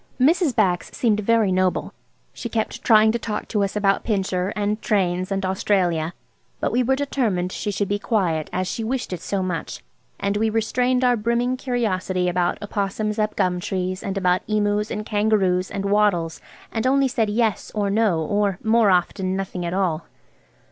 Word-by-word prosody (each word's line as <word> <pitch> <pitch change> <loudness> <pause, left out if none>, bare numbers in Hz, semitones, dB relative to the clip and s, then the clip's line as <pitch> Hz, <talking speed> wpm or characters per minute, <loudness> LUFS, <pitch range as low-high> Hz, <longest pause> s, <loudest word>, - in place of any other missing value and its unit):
Mrs. 305 +1 +3
Bax 185 -6 +1
seemed 220 -4 +2
very 220 -1 +2
noble. 185 0 0 0.4
She 235 - -6
kept 220 -2 -2
trying 220 -1 +6
to 235 - -2
talk 215 -1 -4
to 210 -3 +1
us 195 - -2
about 200 -1 +2
Pincher, 190 -3 -1
and 210 +1 -1
trains 185 -2 0
and 195 -1 -1
Australia, 185 -4 0 0.4
but - - 0
we 250 - +2
were 260 +2 +2
determined 230 -10 -1
she 210 - -3
should 205 0 -1
be 205 +1 -1
quiet, 175 -9 0
as 185 0 -1
she 225 - -3
wished 245 -3 -2
it 175 - -5
so 195 -2 -2
much, 180 -4 -4 0.4
and 200 +1 0
we 220 +1 +1
restrained 250 +3 +1
our 245 -1 +4
brimming 235 +3 0
curiosity 200 -8 -1
about 175 0 0
opossums 210 +1 -2
up 215 0 0
gum 180 -1 +1
trees, 185 +1 -3
and 195 0 -3
about 180 -1 +2
emus 210 0 0
and 210 -1 -4
kangaroos 205 -4 +1
and 195 0 -4
wattles 200 -5 +1 0.3
and 225 +2 -1
only 275 +1 +3
said 225 -4 0
"Yes" 220 -1 0
or 205 -2 0
"No," 205 -6 +2
or, 200 +4 0
more 225 -1 +4
often, 185 +1 +1
nothing 190 -2 -4
at 170 - -3
all. 175 -4 -1
205 Hz, 180 wpm, -22 LUFS, 185-225 Hz, 0.4 s, trying